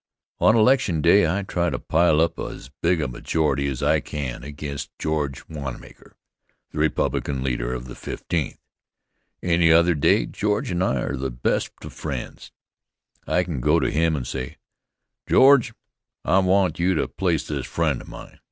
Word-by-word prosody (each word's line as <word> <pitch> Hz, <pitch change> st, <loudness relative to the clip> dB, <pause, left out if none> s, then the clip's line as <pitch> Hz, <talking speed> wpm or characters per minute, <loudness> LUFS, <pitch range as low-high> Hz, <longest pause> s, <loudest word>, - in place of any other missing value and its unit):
On 110 Hz, -, +5 dB
election 110 Hz, -, +3 dB
day 85 Hz, +2 st, +5 dB
I 95 Hz, +5 st, -1 dB
try 85 Hz, -2 st, -1 dB
to 65 Hz, -, -2 dB
pile 80 Hz, +3 st, +2 dB
up 85 Hz, -, 0 dB
as 65 Hz, -, -7 dB
big 85 Hz, -1 st, +2 dB
a 75 Hz, -, -1 dB
majority 70 Hz, +2 st, -1 dB
as 65 Hz, -3 st, -3 dB
I -, -, +3 dB
can 70 Hz, -5 st, -5 dB
against 70 Hz, 0 st, -6 dB
George 75 Hz, -4 st, -3 dB
Wanmaker, 70 Hz, -5 st, -8 dB, 0.6 s
the 75 Hz, -, -5 dB
Republican 75 Hz, -3 st, 0 dB
leader -, -, -2 dB
of 60 Hz, 0 st, -6 dB
the 60 Hz, -, -9 dB
Fifteenth. 80 Hz, +2 st, -4 dB, 0.9 s
Any 85 Hz, -2 st, +3 dB
other 85 Hz, +2 st, +5 dB
day 75 Hz, -, +3 dB
George 105 Hz, -1 st, -2 dB
and 90 Hz, +1 st, 0 dB
I 65 Hz, -9 st, 0 dB
are -, -, -2 dB
the 65 Hz, 0 st, -3 dB
best -, -, -1 dB
of -, -, -9 dB
friends. -, -, -6 dB, 0.8 s
I 90 Hz, +3 st, +2 dB
can 80 Hz, -7 st, -4 dB
go 75 Hz, +5 st, +3 dB
to -, -, 0 dB
him 80 Hz, +1 st, +2 dB
and 65 Hz, -4 st, -4 dB
say: 65 Hz, 0 st, -5 dB, 0.7 s
"George, 130 Hz, -3 st, +6 dB, 0.5 s
I 95 Hz, -, +4 dB
want 95 Hz, -3 st, +2 dB
you 90 Hz, +2 st, +2 dB
to -, -, 0 dB
place 85 Hz, -5 st, -1 dB
this 70 Hz, -4 st, -4 dB
friend 80 Hz, -6 st, -1 dB
of -, -, -14 dB
mine." -, -, -11 dB
80 Hz, 170 wpm, -23 LUFS, 70-90 Hz, 0.9 s, George